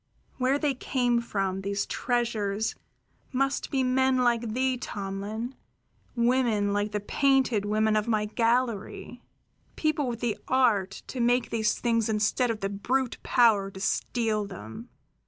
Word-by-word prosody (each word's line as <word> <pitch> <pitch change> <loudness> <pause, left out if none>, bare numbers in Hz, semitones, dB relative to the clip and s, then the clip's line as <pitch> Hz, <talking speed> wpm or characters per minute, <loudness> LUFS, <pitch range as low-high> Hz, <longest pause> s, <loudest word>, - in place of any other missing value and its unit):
Where 260 +2 +2
they 290 -1 0
came 245 -2 0
from, 195 -4 -2
these 200 +1 -1
treasures, 220 -3 -1 0.6
must 275 +1 0
be 265 -2 +1
men 260 +1 +2
like 235 -3 +1
thee, 260 0 +1
Tomlin, 205 +4 -5 0.6
women 235 -4 +2
like 205 +1 0
the 210 - -1
painted 255 -1 +2
women 215 +1 +2
of 215 +1 +1
my 215 -2 +1
gallery, 235 +1 -1 0.5
people 310 -3 0
with 235 -2 -3
the 235 -4 -1
art 215 -8 +2
to 260 - -6
make 245 0 +2
these 220 -2 +1
things 230 -2 +1
instead 215 +3 +1
of 225 -2 -3
the 195 - -1
brute 245 +6 -1
power 220 -5 +3
to 190 - -10
steal 215 +1 0
them. 190 - -9
230 Hz, 140 wpm, -27 LUFS, 210-255 Hz, 0.6 s, power